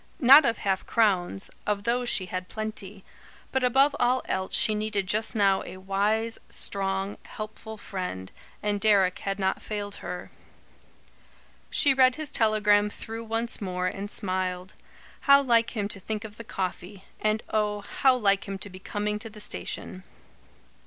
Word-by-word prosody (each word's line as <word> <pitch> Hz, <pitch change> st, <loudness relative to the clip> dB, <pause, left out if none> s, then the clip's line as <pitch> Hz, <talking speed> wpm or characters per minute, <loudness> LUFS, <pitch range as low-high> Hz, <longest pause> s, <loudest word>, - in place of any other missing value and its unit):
Not 275 Hz, +4 st, +9 dB
of 230 Hz, -2 st, +1 dB
half 190 Hz, -2 st, -1 dB
crowns; 185 Hz, -, +1 dB, 0.2 s
of 205 Hz, -1 st, 0 dB
those 240 Hz, +2 st, 0 dB
she 185 Hz, -, +1 dB
had 185 Hz, 0 st, -5 dB
plenty. 210 Hz, -3 st, -5 dB, 0.5 s
But 265 Hz, -1 st, 0 dB
above 270 Hz, +3 st, +4 dB
all 250 Hz, +1 st, +2 dB
else 190 Hz, 0 st, -1 dB
she 215 Hz, -, +4 dB
needed 210 Hz, -2 st, -1 dB
just 215 Hz, +5 st, 0 dB
now 195 Hz, -2 st, +3 dB
a -, -, -9 dB
wise, 205 Hz, +4 st, 0 dB
strong, 195 Hz, 0 st, -1 dB
helpful 220 Hz, +1 st, -8 dB
friend, 180 Hz, -, -5 dB, 0.3 s
and 205 Hz, -1 st, -1 dB
Deryck 195 Hz, -4 st, +3 dB
had 195 Hz, 0 st, -3 dB
not 190 Hz, -1 st, -1 dB
failed 205 Hz, -1 st, -5 dB
her. -, -, -6 dB, 1.4 s
She 280 Hz, -, +4 dB
read 260 Hz, -1 st, +5 dB
his 310 Hz, -2 st, -5 dB
telegram 210 Hz, -2 st, +3 dB
through 225 Hz, +2 st, -7 dB
once 225 Hz, +1 st, -3 dB
more, 180 Hz, -2 st, -2 dB
and 195 Hz, +2 st, -3 dB
smiled. 185 Hz, -2 st, -3 dB, 0.5 s
How 280 Hz, 0 st, +9 dB
like 235 Hz, -3 st, +2 dB
him 205 Hz, -1 st, 0 dB
to 200 Hz, -, -5 dB
think 215 Hz, +2 st, -4 dB
of 215 Hz, -1 st, -10 dB
the 230 Hz, -, -8 dB
coffee; 190 Hz, -1 st, -5 dB
and 215 Hz, 0 st, 0 dB
oh, 210 Hz, -1 st, 0 dB
how 260 Hz, +5 st, +2 dB
like 200 Hz, -5 st, +1 dB
him 195 Hz, 0 st, -4 dB
to 200 Hz, +1 st, -5 dB
be 185 Hz, -, -10 dB
coming 210 Hz, +2 st, -3 dB
to 225 Hz, +1 st, -6 dB
the 215 Hz, 0 st, -13 dB
station. 195 Hz, -2 st, -5 dB
210 Hz, 160 wpm, -27 LUFS, 195-225 Hz, 1.4 s, Not